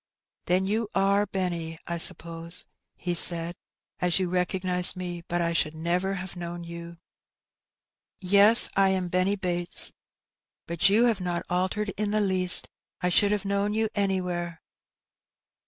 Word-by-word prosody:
'"Then 185 +2 +1
you 215 +3 -1
are 200 +1 +1
Benny, 170 -4 -4
I 170 0 -4
suppose," 165 +1 0 0.3
he 175 -1 -4
said, 170 0 +3 0.5
''as 180 -1 +1
you 185 -2 -1
^recognize 180 0 +1
me, 175 -1 -6
but 175 0 -2
I 170 0 -1
should 155 -1 0
never 175 +4 -2
have 185 0 -7
known 175 0 -7
you." 170 0 -10 1.2
"Yes, 200 +4 +7
I. 195 0 +3
am 185 -2 -2
Benny 185 +3 0
Bates, 175 -3 +2 0.7
but 170 +3 +1
you 220 +4 +3
have 225 -6 0
not 175 -1 -3
altered 190 +4 -1
in 210 0 -2
the 215 +1 0
least; 185 -3 +2 0.3
I 180 - 0
should 200 +3 +3
have 205 -1 -2
known 200 +1 -1
you 220 0 0
anywhere." 180 -4 -3
180 Hz, 145 wpm, -26 LUFS, 175-195 Hz, 1.2 s, Yes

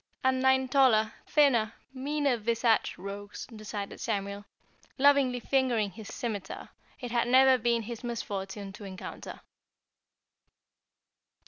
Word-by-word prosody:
And 260 0 +2
nine 265 0 +3
taller, 245 -5 +4
thinner, 240 -7 +3 0.2
meaner 280 0 0
visaged 230 0 +1
rogues, 200 +2 -7
decided 210 -1 -6
Samuel, 200 -2 -3 0.5
lovingly 275 -2 +4
fingering 245 -6 +1
his 215 +2 -10
scimiter, 215 -8 -5 0.3
it 245 -3 -6
had 240 0 +1
never 260 +1 +6
been 235 0 +1
his 235 +2 -7
misfortune 200 -4 -5
to 205 - -11
encounter. 190 -2 -8
235 Hz, 110 wpm, -29 LUFS, 205-260 Hz, 0.5 s, never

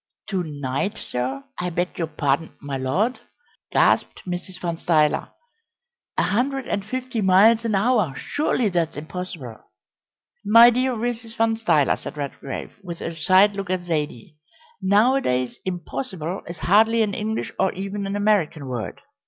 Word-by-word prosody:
"To 190 -2 0
night, 145 +5 -3
sir 130 +2 -3 0.2
I 180 - -1
beg 175 +2 -2
your 165 - 0
pardon, 150 0 -1
my 140 -1 -5
Lord!" 165 - 0 0.5
gasped - - +2
Mrs. 180 0 -5
Van 170 -2 -2
Stuyler. 155 -3 +2 0.9
"A - - +3
hundred 265 +4 0
and 200 - -1
fifty 255 +1 -3
miles 205 +4 +5
an 220 -3 +1
hour! 205 - +2
Surely 255 -6 0
that's 170 -4 -1
impossible." 155 -7 -7 0.8
"My 230 +3 +8
dear 255 +2 +1
Mrs. 230 0 -4
Van 225 0 +2
Stuyler," 165 -11 +2
said - - -8
Redgrave, 140 -1 -5
with 175 -3 -7
a 165 - -5
side 185 +5 +5
look 195 -2 -5
at 185 -1 0
Zaidie, 150 -5 -3 0.4
"nowadays 200 - +2
'impossible' 185 - -4
is 170 +1 -7
hardly 220 +8 +4
an 205 -2 -1
English 220 +3 -2
or 190 - +3
even 195 +1 -4
an 195 - -3
American 205 -8 +1
word. 125 -4 -5
185 Hz, 145 wpm, -23 LUFS, 155-220 Hz, 0.9 s, My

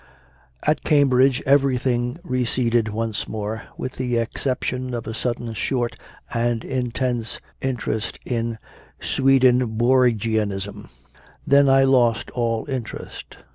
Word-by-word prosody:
5. - - +3
At 155 - -2
Cambridge 135 -3 +3
everything 130 -2 +2
receded 120 - +1
once 110 0 -3
more, 110 0 -4 0.2
with 130 - -5
the 125 -2 -1
exception 125 +1 -2
of 115 - -5
a 110 - -5
sudden 120 0 -3
short 120 +1 -1 0.4
and 115 0 0
intense 125 -2 -2 0.2
interest 120 -4 -2
in 115 -2 -2 0.4
Swedenborgianism. 120 -5 +2 0.6
Then 140 0 +5
I 135 0 +6
lost 125 -4 +3
all 115 -2 -1
interest. 130 -5 -6
120 Hz, 105 wpm, -22 LUFS, 115-130 Hz, 0.6 s, I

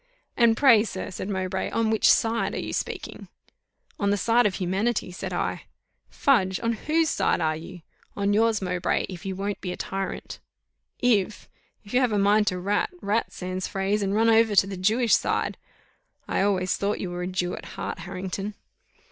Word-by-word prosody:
"And 230 -2 +4
pray, 235 -7 +6
sir," 190 -4 -5
said 190 +2 -5
Mowbray, 190 -1 -2
"on 225 -1 0
which 220 - +4
side 230 0 +1
are - - -2
you - - -5
speaking?" - - -5 0.7
"On 200 - +1
the 205 - +2
side 235 +3 +3
of 190 - -3
humanity," 190 +3 -1
said 180 - -6
I. - - -2 0.4
"Fudge! 190 - +2
On 230 0 +1
whose 315 +7 +1
side - - +1
are 155 -2 +1
you?" 165 +2 -10 0.3
"On 200 0 +1
yours, 220 -1 +2
Mowbray, 180 -1 0
if 180 0 -7
you 190 - -3
won't 200 +1 -3
be 180 - -3
a - - -6
tyrant." 195 0 -5 0.6
"If! 215 -4 +1 0.4
If 205 - -12
you 250 - +4
have 250 -3 +2
a 210 - +1
mind 205 +1 +3
to 185 - +1
rat, 200 +3 0
rat 215 -3 -1
sans 185 0 -4
phrase, 195 +1 -1
and 200 0 0
run 225 +1 +4
over 225 -1 +4
to 195 - +6
the 195 0 -6
Jewish 220 +5 +2
side. - - -1 0.7
I - - 0
always 190 -2 +1
thought 200 +1 -1
you 180 - -4
were 175 0 -4
a 180 - -2
Jew 180 -1 -2
at - - -9
heart, - - -4
Harrington." 195 +2 -5
200 Hz, 190 wpm, -25 LUFS, 185-225 Hz, 0.7 s, pray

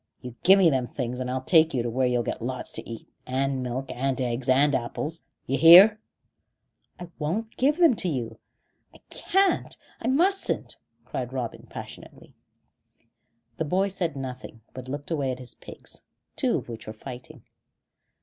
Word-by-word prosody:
You 125 -2 -9
give 190 +2 +7
me 180 -4 +5
them 130 -3 0
things, 125 -1 -4
and 125 0 -3
I'll 130 0 -3
take 160 0 +4
you 120 -1 0
where 125 +2 0
you'll 125 -1 +1
get - - -4
lots 130 +2 -4
to - - -6
eat, 115 -1 -8 0.2
and 135 +1 -1
milk 125 +2 -4
and 135 +1 -2
eggs 125 0 -2
and 140 +3 +4
apples. 145 +6 -3 0.2
D'yer 135 +2 -1
hear?" 190 +6 +9 1.0
"I 175 -1 -8
won't 200 +9 -3
give 290 +4 +2
them 335 -8 +5
to 180 - -1
you. 115 -6 -4 0.6
I - - -13
can't 390 0 +1 0.2
I 230 - -3
mustn't," 360 +10 +2 0.3
cried - - -5
Robin - - -5
passionately. - - -11 1.2
The 160 - -1
boy 190 +6 +1
said 175 -5 -2
nothing, 130 -4 -7
but 130 0 -9
looked 145 +4 -6
away 145 -5 0
at 125 - -5
his 125 -2 -6
pigs, - - -8 0.3
two - - +1
of - - -7
which 115 -2 -9
were 110 - -6
fighting. 120 +3 -10
135 Hz, 170 wpm, -26 LUFS, 125-175 Hz, 1.2 s, hear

